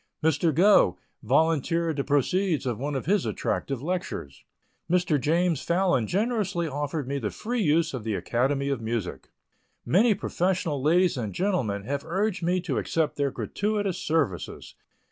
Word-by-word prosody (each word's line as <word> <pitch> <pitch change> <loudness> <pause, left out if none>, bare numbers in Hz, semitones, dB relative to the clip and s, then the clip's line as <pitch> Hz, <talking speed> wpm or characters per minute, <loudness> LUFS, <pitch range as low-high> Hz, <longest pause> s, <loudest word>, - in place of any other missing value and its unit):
Mr. 160 +1 +2
Gough 175 - +5 0.3
volunteered 160 +4 +1
the 140 - 0
proceeds 155 +3 +1
of 120 -3 -2
one 145 +2 -3
of 135 - -3
his 195 +2 +2
attractive 135 -2 -2
lectures; 175 - -4 0.5
Mr. 175 -5 +2
James 165 0 +1
Phalon 170 - +1
generously 200 -4 0
offered 145 -1 -3
me 140 +1 -2
the 110 -5 -2
free 240 - -3
use 160 -2 +2
of 125 -4 -4
the 110 -2 -2
Academy 135 +6 0
of 135 -4 -1
Music; 110 -4 -4 0.6
many 210 +5 +4
professional 180 -6 -1
ladies 170 +3 +3
and 110 -5 -4
gentlemen 130 - 0
have 140 +5 -3
urged 195 +3 -1
me 175 +2 +1
to 165 -7 -1
accept 160 -2 -1
their 140 -1 0
gratuitous 205 +5 -2
services. 145 - -2
160 Hz, 150 wpm, -26 LUFS, 135-180 Hz, 0.6 s, Gough